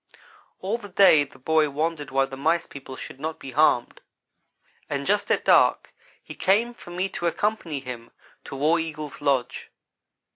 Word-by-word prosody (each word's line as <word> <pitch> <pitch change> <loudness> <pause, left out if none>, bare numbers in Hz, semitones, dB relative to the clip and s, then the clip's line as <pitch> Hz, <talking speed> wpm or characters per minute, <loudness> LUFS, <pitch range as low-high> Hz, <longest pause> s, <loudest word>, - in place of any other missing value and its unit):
All 205 +5 -2
the 205 -3 -10
day 180 -6 +6
the 135 - -18
boy 155 +3 +2
wondered 150 0 -2
why 135 0 +2
the 135 - -9
Mice 165 +5 +1
people 135 -1 -10
should 130 - -9
not 160 +2 -4
be 135 - -9
harmed; 135 -3 +2 0.9
and 140 -1 -2
just 205 +3 +1
at - - +1
dark - - +4 0.3
he - - -9
came 220 +6 +1
for 205 - -14
me 180 +2 -2
to 175 - -3
accompany 170 -6 -1
him 120 -3 -8 0.4
to - - -7
War 155 +5 +2
Eagle's 155 -3 -6
lodge. 135 -4 -1
155 Hz, 170 wpm, -25 LUFS, 135-175 Hz, 0.9 s, day